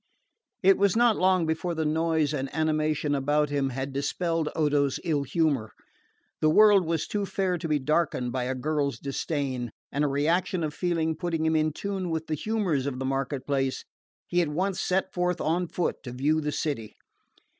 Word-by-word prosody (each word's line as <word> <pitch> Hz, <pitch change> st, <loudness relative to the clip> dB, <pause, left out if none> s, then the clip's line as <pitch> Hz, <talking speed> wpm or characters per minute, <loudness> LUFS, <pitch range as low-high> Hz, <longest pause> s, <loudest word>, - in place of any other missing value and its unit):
It 195 Hz, +1 st, +5 dB
was 200 Hz, -1 st, +3 dB
not 235 Hz, -1 st, +4 dB
long 185 Hz, -2 st, +3 dB
before 160 Hz, +2 st, -1 dB
the 160 Hz, -1 st, -1 dB
noise 160 Hz, -1 st, +1 dB
and 135 Hz, -2 st, -3 dB
animation 155 Hz, -2 st, +1 dB
about 145 Hz, +1 st, +1 dB
him 140 Hz, -2 st, 0 dB
had 135 Hz, +1 st, -4 dB
dispelled 160 Hz, +3 st, -1 dB
Odo's 145 Hz, -3 st, +1 dB
ill 155 Hz, -5 st, +1 dB
humour. 140 Hz, -5 st, 0 dB, 0.7 s
The 155 Hz, -, +3 dB
world 200 Hz, 0 st, +6 dB
was 165 Hz, -2 st, 0 dB
too 205 Hz, -1 st, -2 dB
fair 185 Hz, -3 st, -1 dB
to 165 Hz, -, -3 dB
be 150 Hz, -1 st, +2 dB
darkened 145 Hz, -3 st, 0 dB
by 125 Hz, -1 st, -2 dB
a 130 Hz, +1 st, -2 dB
girl's 145 Hz, +1 st, -1 dB
disdain, 135 Hz, -3 st, -3 dB, 0.2 s
and 145 Hz, -, 0 dB
a -, -, +3 dB
reaction 165 Hz, +5 st, +1 dB
of 150 Hz, -1 st, -2 dB
feeling 165 Hz, -2 st, 0 dB
putting 165 Hz, -1 st, -2 dB
him 160 Hz, 0 st, +2 dB
in 155 Hz, 0 st, +2 dB
tune 190 Hz, +2 st, -4 dB
with 160 Hz, -1 st, -2 dB
the 155 Hz, -, -3 dB
humours 175 Hz, -6 st, -1 dB
of 135 Hz, -2 st, -3 dB
the 130 Hz, -, -3 dB
market 135 Hz, 0 st, -2 dB
place, 135 Hz, -2 st, -1 dB, 0.4 s
he 175 Hz, -, +1 dB
at 170 Hz, -, 0 dB
once 185 Hz, +5 st, -1 dB
set 190 Hz, +1 st, 0 dB
forth 180 Hz, 0 st, 0 dB
on 175 Hz, +3 st, 0 dB
foot 175 Hz, -, -1 dB
to 125 Hz, -, -5 dB
view 150 Hz, +5 st, +1 dB
the 150 Hz, 0 st, -2 dB
city. 135 Hz, -8 st, -3 dB
155 Hz, 190 wpm, -27 LUFS, 140-175 Hz, 0.7 s, world